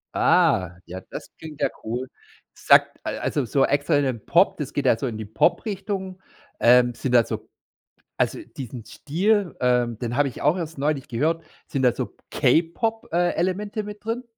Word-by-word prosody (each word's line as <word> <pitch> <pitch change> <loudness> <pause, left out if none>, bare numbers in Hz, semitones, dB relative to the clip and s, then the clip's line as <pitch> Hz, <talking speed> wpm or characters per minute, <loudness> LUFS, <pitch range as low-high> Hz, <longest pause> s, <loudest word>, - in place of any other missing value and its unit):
Ah, 90 -1 +3
ja, 95 +2 -8
das - - -8
klingt 155 -2 -10
ja - - +3
cool. 125 +3 -3 0.5
Sagt - - +4
also 145 -4 -1
so 135 +3 +2
extra 145 +2 +1
in 145 - +2
den 125 -5 -3
Pop, 175 +4 +3
das 145 -2 -5
geht 145 -1 -1
ja 115 - +4
so 135 - -3
in 110 -3 -4
die 110 - -5
Pop-Richtung, 190 - -1 0.4
ähm, 120 0 +5
sind 125 0 -3
da 120 -1 +7
so - - -6 0.7
also - - +1 0.2
diesen 125 -3 -7
Stil, 185 - 0
ähm, 125 -2 +2
den 120 0 -3
habe 145 - +3
ich 125 - -9
auch 150 +5 +3
erst 165 -2 -5
neulich 145 -1 -1
gehört. 160 +7 -1 0.2
Sind 135 - -2
da 125 - +5
so - - -5
K-Pop 220 +8 +1
äh, 175 +1 +2
Elemente 205 +4 -2
mit 210 0 -9
drin? 230 +3 -3
145 Hz, 180 wpm, -24 LUFS, 125-185 Hz, 0.7 s, da